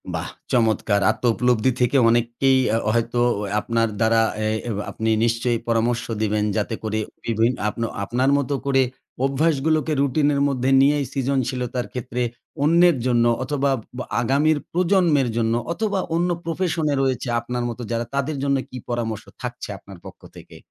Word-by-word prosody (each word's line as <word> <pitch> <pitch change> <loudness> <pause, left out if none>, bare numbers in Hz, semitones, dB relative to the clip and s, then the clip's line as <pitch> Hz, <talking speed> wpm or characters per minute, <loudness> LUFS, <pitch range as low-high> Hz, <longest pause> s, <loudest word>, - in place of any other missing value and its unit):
বাহ! - - -3 0.2
চমৎকার। 110 -3 +2
আত্মউপলব্ধি 125 0 +1
থেকে 125 +3 +3
অনেককেই 120 +3 +2 0.2
আ - - +3 0.2
হয়তো 115 +1 0 0.4
আপনার 115 +1 0
দ্বারা 115 0 +3 0.2
এ - - +1 0.4
আপনি 110 0 -2 0.2
নিশ্চয়ই 115 0 0
পরামর্শ 115 +1 +1 0.2
দিবেন। 105 -1 +1
যাতে 110 +1 -1
করে 110 0 -1 0.2
বিভি 115 0 +2 0.2
আপন 115 +2 -3 0.2
আপনার 125 +6 +1
মত 140 -3 -2 0.2
করে 135 -1 +3 0.4
অভ্যাসগুলোকে 155 +2 +1
রুটিনের 140 +1 +2
মধ্যে 130 -2 0
নিয়েই 145 +1 +3
সৃজনশীলতার 130 -2 -1
ক্ষেত্রে। 125 0 -4 0.4
অন্যের 170 +1 +5
জন্য 120 -2 +3 0.2
অথবা 140 +1 0 0.3
ব - - -4 0.2
আগামীর 145 +6 +2
প্রজন্মের 170 -7 +2
জন্য 115 -1 +1 0.2
অথবা 205 0 -1 0.2
অন্য 175 +2 +1
প্রফেশন 165 -1 -1
এ - - +1
রয়েছে 130 -2 -1
আপনার 120 +1 -4
মত 120 - -7
যারা। 115 0 -1
তাদের 140 +2 -1
জন্য 140 -1 +2
কী 125 - -8
পরামর্শ 115 -3 -2 0.2
থাকছে - - -6
আপনার 100 -2 -13
পক্ষ - - -11
থেকে? - - -13
125 Hz, 145 wpm, -22 LUFS, 115-145 Hz, 0.4 s, অন্যের